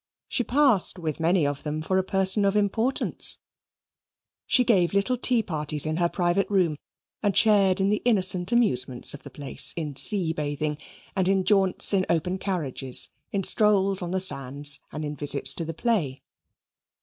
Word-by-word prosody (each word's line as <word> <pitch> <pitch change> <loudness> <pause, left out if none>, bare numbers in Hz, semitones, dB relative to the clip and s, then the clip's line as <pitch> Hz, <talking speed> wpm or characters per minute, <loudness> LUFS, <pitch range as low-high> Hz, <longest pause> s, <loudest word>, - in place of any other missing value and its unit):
She 255 - -2
passed 250 -9 +3
with 160 -4 -5
many 165 0 +1
of 145 0 -3
them 155 +1 -5
for 185 +3 0
a - - -1
person 195 +2 +3
of 200 0 0
importance; 220 +5 0 1.1
she 250 - +3
gave 195 -6 +1
little 200 +6 0
tea 245 -2 +1
parties 150 -4 0
in 155 +1 -3
her 170 -1 0
private 175 +2 -1
room 180 -7 0 0.4
and 205 -2 0
shared 200 -4 +3
in 195 +1 +1
the 210 - -1
innocent 190 -5 +2
amusements 130 - +1
of 145 - -10
the - - -12
place 140 -2 0
in 150 -4 -5
sea 170 +3 +4
bathing, 150 -1 -4 0.4
and 190 -2 0
in 190 0 +1
jaunts 195 0 +2
in 190 -2 0
open 180 +3 -1
carriages, 145 -9 -2 0.2
in 195 -1 -2
strolls 195 -1 +3
on 175 - -5
the 190 +1 -2
sands, 140 -5 -1
and 155 0 -6
in 150 0 -6
visits 145 0 -2
to 170 - -5
the 165 - -5
play. 165 - -2
185 Hz, 175 wpm, -24 LUFS, 155-200 Hz, 1.1 s, sea